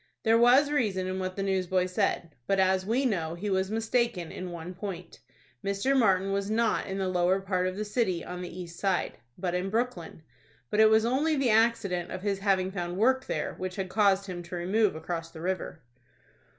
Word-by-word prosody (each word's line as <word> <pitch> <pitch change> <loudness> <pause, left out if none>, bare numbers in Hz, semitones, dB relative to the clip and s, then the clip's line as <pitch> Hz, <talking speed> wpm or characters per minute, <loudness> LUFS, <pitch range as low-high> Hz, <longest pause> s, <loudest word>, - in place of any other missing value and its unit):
There 225 0 +4
was 250 +5 +5
reason 210 -10 0
in 185 0 -3
what 185 0 -3
the 195 - -2
newsboy 185 -1 +1
said; 180 -3 -1
but, 195 - +2
as 190 0 +2
we 250 +5 +1
know, 170 -8 -1
he 200 +4 -3
was 190 0 +1
mistaken 225 -5 0
in 185 0 -6
one 170 +1 -7
point,—Mr. 185 - -4
Martin 195 -6 +3
was 200 0 -1
not 225 +1 +1
in 190 - -4
the 190 -1 -1
lower 185 +1 +2
part 185 -1 -1
of 185 +1 -4
the 215 - -2
city, 205 -6 -1
on 180 0 -6
the 180 - -5
east 170 -1 -9
side, 195 -2 -1 0.2
but 180 -1 -2
in 180 +2 -1
Brooklyn, 215 -8 -3 0.5
but 210 - +1
it 220 0 +7
was 220 0 +4
only 285 +6 +1
the 270 -5 +2
accident 215 -6 +2
of 185 0 -6
his 200 -2 -1
having 190 -2 +1
found 175 -2 -4
work 260 +5 +3
there, - - -2
which 185 -1 -4
had 190 -1 -3
caused 200 -1 +3
him 180 -2 -6
to 175 +1 -8
remove 190 +3 +1
across 165 +1 -4
the 160 -1 -11
river. 180 -3 -3
190 Hz, 205 wpm, -28 LUFS, 180-220 Hz, 0.5 s, it